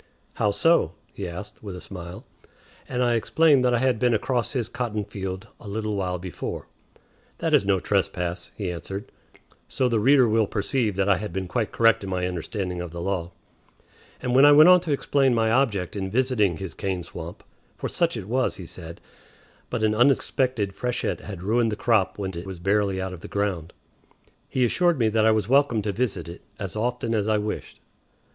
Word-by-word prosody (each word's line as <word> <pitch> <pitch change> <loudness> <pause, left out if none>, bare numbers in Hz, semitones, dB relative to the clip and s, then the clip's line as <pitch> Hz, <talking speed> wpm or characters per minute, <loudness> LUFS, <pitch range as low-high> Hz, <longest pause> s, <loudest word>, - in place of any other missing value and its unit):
"How 105 - +1
so?" 165 - +3 0.2
he - - -5
asked, 90 +5 -8
with 100 -4 -7
a - - -7
smile; 90 -2 -9 0.6
and 125 0 0
I 120 -1 +2
explained 140 +4 +3
that 125 -1 +3
I - - +3
had 125 -2 +1
been 120 -1 +3
across 120 +4 -1
his 120 -5 -1
cotton 115 -5 -3
field 95 +2 -6
a 110 - -12
little 105 +1 -2
while 90 -2 -1
before. 90 0 -6 0.7
"That - - -1
is 100 - +4
no 95 -2 +3
trespass," 90 -2 -1
he 95 -4 -2
answered 95 +4 -7 0.6
(so 130 - 0
the 115 -3 +1
reader 130 +2 +5
will 110 -1 +2
perceive 110 0 -1
that 95 0 +1
I 100 -2 +4
had 105 -1 -5
been 95 +1 -3
quite 110 +3 -1
correct 115 -1 +3
in 95 - -5
my 90 -1 -1
understanding 90 +1 -3
of 90 - -5
the 85 +1 -8
law); 85 -1 -2 0.9
and 125 - -2
when 135 +2 +6
I 145 0 +8
went 155 +4 +8
on 180 0 +8
to 170 -3 -4
explain 135 -2 +2
my 110 -1 +2
object 110 -9 +1
in 95 -1 -3
visiting 110 -6 +1
his 95 -4 -6
cane 95 -3 -3
swamp 85 +1 -9 0.3
(for - - -3
such 170 -7 0
it 100 -3 -7
was, 130 +3 +1
he 90 - -8
said, 85 0 -9 0.7
but 120 -3 -2
an 110 0 +3
unexpected 120 -3 +2
freshet 125 +2 -2
had 95 -4 -8
ruined 115 +3 +2
the - - -1
crop 105 -4 +1
when 95 -2 -3
it 85 +3 -6
was 95 -1 -6
barely 100 +1 +1
out 95 0 -3
of 90 - -10
the - - -8
ground), 95 -5 -2 0.8
he 130 -1 +2
assured 175 +6 +2
me 115 -3 +2
that 110 0 +3
I - - +6
was 110 -1 +1
welcome 130 -4 +3
to 105 - -1
visit 100 -6 -2
it 85 +2 -9 0.2
as 95 -1 -5
often 120 +1 -1
as 105 -2 0
I 110 -1 +3
wished. 105 0 -5
105 Hz, 205 wpm, -25 LUFS, 95-120 Hz, 0.9 s, I